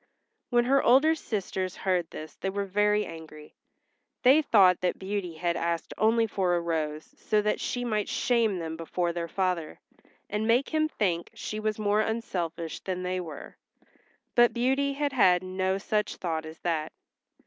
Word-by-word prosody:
When 240 -1 +3
her 275 +2 +4
older 275 +6 +5
sisters 190 - -3
heard 180 -3 0
this 155 0 -8
they 195 - -4
were 200 +1 -2
very 210 +2 +2
angry. 155 -2 -11 0.7
They 265 +5 +7
thought 195 - +5
that 180 - 0
Beauty 190 -3 -4
had 170 +1 -1
asked 170 -1 -2
only 225 +1 +3
for 190 -4 0
a - - +1
rose 155 -2 -3
so 215 - +1
that 210 - 0
she 245 0 -2
might 215 -3 -1
shame 230 -5 +1
them 160 -2 -4
before 170 +1 -2
their 170 -1 -3
father, 180 -3 -2 0.5
and 210 +2 -2
make 240 +4 +3
him 310 -1 +1
think 175 - -1
she 215 - -5
was 215 -1 -1
more 210 0 +2
unselfish 175 -8 -3
than 185 -1 -4
they 185 0 -1
were. 160 -5 -8 0.8
But 240 0 +4
Beauty 270 +3 +1
had 285 0 -1
had 185 -7 +4
no 185 +1 -1
such 210 +1 -1
thought 160 -3 -3
as 160 - -10
that. 160 -3 -1
190 Hz, 170 wpm, -28 LUFS, 170-225 Hz, 0.8 s, They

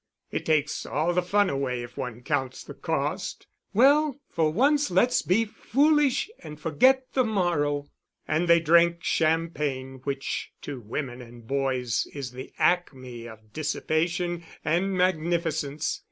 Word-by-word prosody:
"It - - -3
takes 150 -2 +1
all 160 +4 0
the 180 - +2
fun 200 +3 +2
away 135 -5 -2
if 120 0 -10
one 125 -1 -5
counts 135 -3 -2
the - - -9
cost." - - -3 0.3
"Well, 285 +4 +4
for 160 -3 +1
once 280 - +3
let 190 +8 +4
us - - +2
be 220 +6 +2
foolish 285 +5 +2
and 150 0 -10
forget 255 - +3
the 260 - +3
morrow." 170 -9 0 0.4
And 160 +3 +1
they 170 0 +6
drank 170 +2 +4
champagne, 150 -5 0
which 135 -1 -3
to 140 -3 -5
women 120 +3 -5
and 120 -1 -13
boys 130 -2 0
is 135 -3 -5
the 130 +1 -9
acme 130 -9 0
of 110 -2 -14
dissipation 170 +3 -1 0.2
and 185 +4 +1
magnificence. 160 -4 0
155 Hz, 140 wpm, -26 LUFS, 135-180 Hz, 0.4 s, they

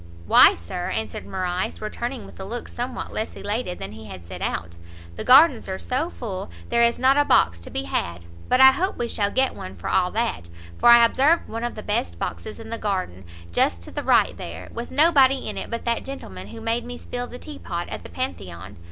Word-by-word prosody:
"Why - - +7
Sir," 85 - -5
answered 110 -1 -4
Morrice, 185 -1 -2
returning 240 +3 -4
with - - -14
a - - -5
look 230 +5 -5
somewhat 245 +1 -5
less 220 - -3
elated 205 -3 -3
than 95 - -6
he 110 +1 -10
had 95 -3 -10
set - - -8
out, 85 0 -3 0.4
"the - - -5
gardens 260 -4 +6
are 190 - -2
so 265 - -2
full, 205 - -6 0.2
there 235 - +2
is 235 0 +4
not 265 +2 +4
a 290 - +5
box 85 - +3
to 85 - -11
be 90 - -2
had; 85 -1 -3 0.2
but 255 - +3
I 265 0 +10
hope 365 +9 -1
we 240 - -1
shall 205 -3 0
get 260 +4 +1
one 95 +1 -8
for 85 - -5
all 180 -1 +3
that; 225 - -2 0.3
for 240 - +6
I 235 0 +9
observed 285 +8 +3
one 230 +1 -5
of 240 - -3
the 215 - -7
best 85 - -2
boxes 85 - -5
in 225 0 -9
the 230 - -3
garden, 185 - -3 0.3
just 85 0 +1
to - - -10
the - - -3
right - - +3
there, 85 +1 -8
with 235 +1 -5
nobody 275 -3 +4
in - - -4
it - - -5
but 230 -1 -4
that 235 -1 0
gentleman 95 - -8
who 225 - -10
made 230 +1 -1
me 245 +1 -7
spill 245 0 -5
the 245 - -9
tea 300 +2 -9
pot 170 -1 -4
at - - -5
the - - -11
Pantheon. 95 - -6
225 Hz, 230 wpm, -24 LUFS, -, 0.4 s, I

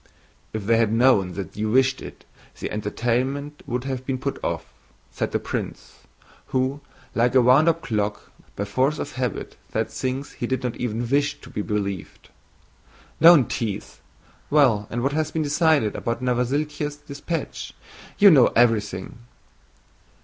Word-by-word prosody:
"If 110 -2 -5
they 115 +2 +4
had 115 -2 +2
known 115 -6 +3
that 95 -4 -6
you 110 +1 -1
wished 130 +3 +3
it, - - -10 0.3
the - - -4
entertainment 125 +7 -2
would 125 0 -2
have 130 -1 -4
been 130 0 -2
put 140 +2 -4
off," - - -2 0.5
said - - -3
the - - +1
prince, - - -6 0.5
who, 130 +2 -1 0.3
like 120 +2 +2
a 130 - +7
wound 135 +7 +6
up 165 0 -1
clock, 105 -3 -2 0.2
by 100 - -2
force 130 +8 +1
of 145 - -4
habit 125 -5 -4
said - - -1
things 130 +2 -3
he 120 - -4
did 130 0 -2
not 125 -2 -2
even 120 0 -2
wish 145 +3 +1
to - - -13
be - - -3
believed. 100 -3 -4 0.9
"Don't 165 -6 +8
tease! 110 -4 -4 0.5
Well, 125 -9 +3
and 120 +1 -3
what 135 - +1
has 155 0 0
been 160 0 -1
decided 150 -6 +2
about 115 0 -2
Novosíltsev's 145 +4 -1
dispatch? 150 +3 -5 0.4
You 205 -2 +8
know 135 -6 +7
everything." 110 -4 +1
125 Hz, 155 wpm, -24 LUFS, 115-145 Hz, 0.9 s, Don't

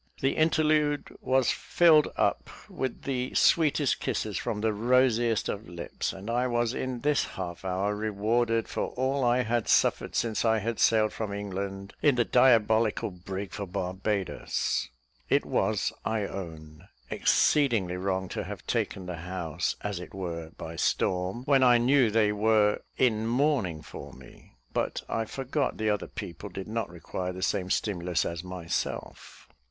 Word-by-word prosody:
The 135 - +1
interlude 155 -2 +2
was 130 -1 +2
filled 160 -3 +4
up - - +1 0.2
with 130 -2 -4
the 130 -2 -2
sweetest 150 -4 +3
kisses - - -2
from 105 - -2
the 110 0 +1
rosiest 120 0 +2
of 105 -1 -5
lips; 85 0 -4
and 95 +2 -10
I 120 +2 +1
was 120 -1 0
in 130 -2 -3
this 145 +1 +2
half 90 -2 -6
hour 95 +2 -1
rewarded 110 +2 0
for - - -2
all 130 +1 0
I 125 +1 +3
had 120 -1 -1
suffered - - +2
since 115 -2 0
I 110 -1 +3
had 115 +1 -3
sailed 110 -1 +3
from 110 -2 -4
England 100 -1 -5
in 145 -3 +4
the 120 -1 +2
diabolical 110 -4 +3
brig 95 +2 -6
for 100 -1 -5
Barbadoes. 95 +2 -2 0.4
It - - +3
was, - - 0
I 110 -1 -1
own, 80 -6 -8 0.2
exceedingly 115 -12 +2
wrong 95 0 -1
to - - -3
have - - -8
taken 95 - -2
the 90 -1 -5
house, 90 -1 -3
as 105 -3 -3
it 90 - -10
were, 85 -4 -5
by 80 0 -7
storm, 90 +9 0
when 140 -1 +4
I 125 -2 +6
knew 125 0 +4
they 105 -1 +3
were 105 0 +3 0.2
in 110 -3 +2
mourning 120 - +1
for - - -9
me; 65 -2 -16 0.2
but - - -1
I 115 - -1
forgot 135 +5 -2
that 110 -1 +1
other 105 - -4
people 85 +5 -7
did 95 +1 -7
not 110 -2 -2
require 90 +2 -5
the 95 +1 -6
same 95 -2 0
stimulus 90 -4 0
as 85 0 -4
myself. 90 -2 -5
110 Hz, 160 wpm, -28 LUFS, 95-125 Hz, 0.4 s, I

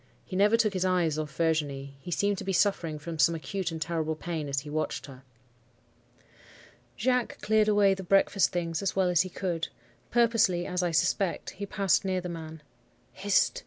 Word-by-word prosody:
He 185 - -7
never 205 +4 +4
took 215 -3 +2
his 185 -1 -1
eyes 175 -4 +1
off 150 -2 -5
Virginie; 145 -4 -1
he 140 - -10
seemed 200 +3 0
to - - -5
be 195 - -2
suffering 170 -5 +1
from 160 +2 -7
some 165 +2 +4
acute 180 +3 -3
and 160 - -5
terrible 160 -1 -2
pain 155 -2 -4
as 140 0 -1
he 150 - -13
watched 155 +1 -2
her. 135 -2 -12 1.8
"Jacques 250 +1 0
cleared 215 0 +3
away 205 -2 +4
the 190 - -5
breakfast 195 +1 +3
things 165 -2 -2
as 195 - -1
well 190 -2 +2
as 175 -2 +4
he 185 - -3
could. 175 -2 -3 0.4
Purposely, 230 -7 +3
as 180 -1 -1
I 175 - +1
suspect, 170 +3 0
he 200 +1 -7
passed 195 -2 +1
near 190 -1 0
the 180 0 -6
man. 160 -2 -8 0.5
"'Hist! - - +1
175 Hz, 190 wpm, -28 LUFS, 160-195 Hz, 1.8 s, never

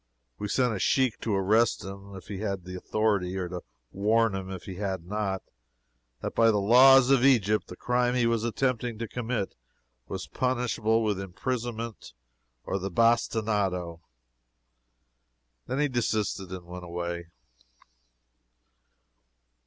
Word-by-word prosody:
We 105 - -3
sent 125 +2 +1
a 100 - -3
sheik 130 +1 +2
to 110 -3 0
arrest 110 +4 +2
him 100 +1 -9
if 95 - -10
he 100 -2 -5
had 100 -3 -3
the 90 - -7
authority, 95 -1 0
or 90 -1 -2
to 90 0 -6 0.3
warn 110 +2 +2
him, 95 -1 -4
if 95 -2 -6
he 95 -2 -8
had 95 -4 -3
not, 100 -1 -2 0.8
that - - -4
by 115 0 +5
the 105 - +3
laws 125 +5 +7
of 135 -2 +4
Egypt 110 -6 +3
the 90 - -9
crime 125 +3 +1
he 120 -1 +2
was 115 -1 +1
attempting 120 -1 -1
to 115 +1 -4
commit 115 -3 -3 0.5
was 95 -1 -5
punishable 120 -3 0
with 105 -3 0
imprisonment 115 - -4 0.5
or 95 - -2
the 95 +1 -3
bastinado. 105 -6 +1 1.7
Then 130 - -2
he 150 +1 +2
desisted 110 -6 -1
and 90 -2 -7
went 90 +1 -8
away. 85 0 -4
105 Hz, 140 wpm, -28 LUFS, 95-120 Hz, 1.7 s, laws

